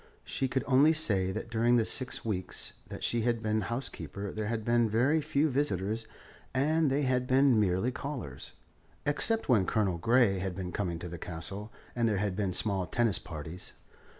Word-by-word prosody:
She 135 - -1
could 130 +1 -1
only 140 +4 +5
say 100 -12 +2
that 115 - -5
during 120 +1 +3
the 115 -2 +3
six 130 +1 -3
weeks 95 -5 -3
that - - -8
she 120 - +1
had 120 0 +1
been 110 -1 0
housekeeper 100 - -4
there 110 -1 -3
had 110 -1 -2
been 120 -1 +3
very 130 +9 +3
few 145 +1 +1
visitors; 115 - 0 0.5
and 155 +3 +3
they 140 +2 +1
had 125 -1 +1
been 130 -2 +5
merely 100 +4 +1
callers, 125 - -6 0.5
except 220 +10 +1
when 110 -8 +4
Colonel 95 -6 +1
Grey 115 -1 +3
had 95 -1 -3
been 90 -1 -4
coming 90 -3 -2
to 85 - -6
the 85 -1 -7
Castle 100 +7 -5 0.2
and 120 -1 +2
there 105 - +1
had 100 -1 -1
been 100 -2 0
small 95 -1 -1
tennis 115 +2 +1
parties. 80 +2 -7
110 Hz, 180 wpm, -30 LUFS, 95-130 Hz, 0.5 s, only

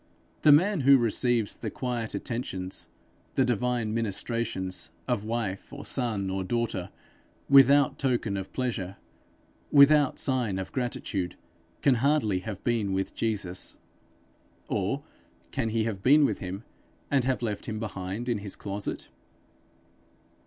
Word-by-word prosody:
The 150 - +7
man 185 +6 +5
who 140 0 +7
receives 120 -1 +2
the - - -5
quiet 120 -3 -3
attentions, 95 -6 -4 0.5
the 130 - +4
divine 120 -2 0
ministrations, 110 -3 -2 0.2
of 120 -5 0
wife 110 -4 -3
or 140 0 -8
son 110 -7 -1
or 95 0 -2
daughter, 100 -3 -2 0.6
without 140 0 +6
token 120 -6 0
of 95 -1 -5
pleasure, 105 -7 -3 0.7
without 145 -1 +6
sign 125 -8 +1
of 95 -1 -5
gratitude, 105 -8 -2 0.5
can 140 - +5
hardly 135 -9 +2
have 100 0 -7
been 110 -5 0
with 95 0 -2
Jesus. 100 -5 -2 0.9
Or - - -1 0.5
can 115 - -1
he 110 0 +1
have 110 -4 -3
been 145 +6 +6
with - - -1
him, 95 +3 -6 0.5
and 140 -3 +3
have 130 -2 0
left 105 -3 -3
him 110 -1 -3
behind 100 +1 -4
in 120 -4 0
his 100 -1 -6
closet? 100 0 -5
115 Hz, 130 wpm, -28 LUFS, 100-130 Hz, 0.9 s, The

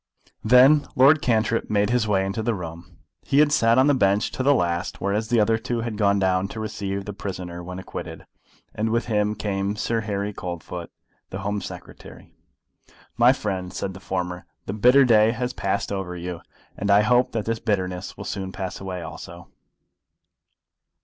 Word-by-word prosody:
Then 130 +6 +6
Lord 140 +4 +6
Cantrip 115 -1 +1
made 105 +1 +1
his 120 -3 +1
way 95 -2 +2
into 95 +3 -3
the 115 0 0
room. 85 -2 -9 0.2
He 135 - -1
had 150 0 +5
sat 115 -4 +3
on 130 - +5
the 145 - +4
bench 100 -5 +2
to - - -4
the 140 +2 +4
last, 85 -4 -1
whereas 105 +3 -1
the 120 0 +2
other 110 +1 +2
two 120 0 -2
had 115 -1 -4
gone 100 -1 +2
down 95 0 +1
to 110 - -8
receive 100 -2 -4
the 105 - -5
prisoner 90 -3 -6
when 90 +1 -7
acquitted; 95 - -8 0.5
and 110 +1 -1
with 115 +1 0
him 105 -2 0
came 100 -1 -2
Sir 115 +1 -1
Harry 105 -1 -3
Coldfoot, 85 -1 -6 0.4
the 95 - -6
Home 100 +1 -2
Secretary. - - -11 0.8
"My 120 +2 +6
friend," 95 -8 -3
said 95 0 -4
the 95 - -10
former, 90 -1 -4 0.2
"the 95 - -4
bitter 125 +6 +5
day 110 -2 +5
has 125 +1 -3
passed 100 +1 -2
over 95 -3 -4
you, 85 -1 -6 0.3
and 100 - -3
I 100 +1 +6
hope 125 +3 +3
that 110 -2 -2
the 115 0 -2
bitterness 95 -5 -2
will - - -7
soon 95 -1 -4
pass 95 -1 -5
away 90 -2 -5
also." - - -10
105 Hz, 185 wpm, -24 LUFS, 95-115 Hz, 0.8 s, Then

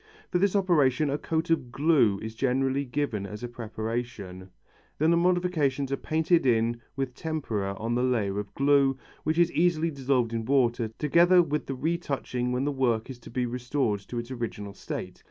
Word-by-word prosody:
For 180 - +2
this 200 +1 +2
operation 155 -7 +3
a 145 - -1
coat 165 +1 -1
of 135 -7 0
glue 135 -8 +3
is 110 0 -5
generally 135 +3 0
given 120 -6 -2
as 105 +4 -8
a - - -2
preparation, 110 -5 -5 0.5
then 155 +2 +3
the - - +5
modifications 170 -6 +1
are - - +2
painted 160 +4 +1
in 120 -1 +1
with 135 -2 -2
tempera 115 -11 -3
on 115 +3 -2
the 120 - +1
layer 110 -6 0
of 105 -1 -6
glue, 140 -1 +3 0.3
which 155 +1 0
is 175 0 +4
easily 165 -1 +2
dissolved 130 -4 0
in 115 -1 -1
water, 120 -2 +2
together 175 +4 +5
with 150 -2 -2
the 135 - -3
retouching 135 -5 -2
when 125 +2 0
the 145 - +1
work 125 -3 0
is 125 - -10
to - - -12
be 125 +1 -1
restored 125 -2 -1
to 110 +5 -8
its 120 +2 -5
original 110 -5 -5
state. - - -6
130 Hz, 185 wpm, -27 LUFS, 115-155 Hz, 0.5 s, the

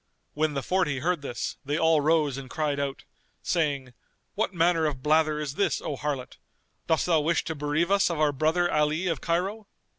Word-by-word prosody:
When 155 0 0
the 140 - -2
Forty 180 -7 +1
heard 170 +3 0
this, 120 -4 -4
they 145 +1 -1
all 160 -2 +3
rose 150 -2 +2
and 135 -1 -8
cried 150 -1 -1
out, 140 -1 -3 0.4
saying, 140 -7 -1 0.4
"What 215 -1 -1
manner 165 -2 +2
of 135 -4 -4
blather 155 0 +3
is 150 -3 -3
this, 200 +7 0
O 145 - -4
harlot? 135 -2 -4 0.5
Dost 160 -3 +2
thou 165 -3 +3
wish 160 +3 +1
to 160 - -3
bereave 150 +4 -1
us 200 -1 +4
of 170 -3 -3
our 150 -1 +3
brother 160 +5 +1
Ali 150 +4 +1
of 165 -3 -1
Cairo?" 195 +5 -1
155 Hz, 190 wpm, -27 LUFS, 145-170 Hz, 0.5 s, us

